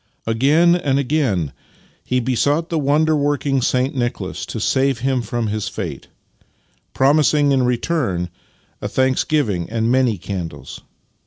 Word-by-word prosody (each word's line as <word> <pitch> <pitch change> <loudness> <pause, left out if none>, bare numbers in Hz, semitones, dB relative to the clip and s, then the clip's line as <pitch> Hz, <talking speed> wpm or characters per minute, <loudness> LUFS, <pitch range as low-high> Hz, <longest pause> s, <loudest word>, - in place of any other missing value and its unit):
Again 145 +10 +3
and 140 -6 0
again 125 - 0 0.5
he 125 - 0
besought 140 +6 0
the 165 - 0
wonder 155 +2 +2
working 145 -2 0
Saint 130 +2 +1
Nicholas 120 -3 -3
to - - -5
save 135 -3 +1
him 130 -1 +1
from 120 0 -3
his 105 0 -2
fate, - - -6 0.9
promising 145 +1 +3
in 135 -1 +3
return 120 - -1 0.5
a - - -2
thanksgiving 130 - 0
and 115 +1 0
many 125 -4 +2
candles. 85 -5 -6
130 Hz, 130 wpm, -20 LUFS, 115-145 Hz, 0.9 s, Again